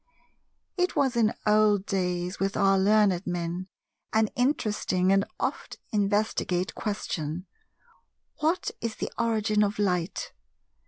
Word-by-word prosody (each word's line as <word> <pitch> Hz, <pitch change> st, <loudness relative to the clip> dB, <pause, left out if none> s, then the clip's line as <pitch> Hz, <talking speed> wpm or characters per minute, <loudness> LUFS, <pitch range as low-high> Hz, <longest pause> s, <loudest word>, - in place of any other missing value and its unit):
It 360 Hz, 0 st, +1 dB
was 265 Hz, -3 st, +2 dB
in 225 Hz, -2 st, +3 dB
old 210 Hz, -2 st, +4 dB
days, 180 Hz, -2 st, -2 dB
with 195 Hz, +1 st, -1 dB
our 195 Hz, -1 st, +4 dB
learned 200 Hz, -2 st, +3 dB
men, 175 Hz, +1 st, -3 dB, 0.4 s
an 220 Hz, -1 st, +2 dB
interesting 210 Hz, -8 st, +1 dB
and 195 Hz, 0 st, +4 dB, 0.2 s
oft -, -, -3 dB
investigate 205 Hz, -3 st, 0 dB
question, 180 Hz, -5 st, -3 dB, 0.9 s
"What 325 Hz, +4 st, 0 dB
is 225 Hz, -1 st, -3 dB
the -, -, -4 dB
origin 215 Hz, -2 st, +1 dB
of 205 Hz, +1 st, -1 dB
light?" 180 Hz, -3 st, -1 dB
205 Hz, 115 wpm, -27 LUFS, 185-215 Hz, 0.9 s, old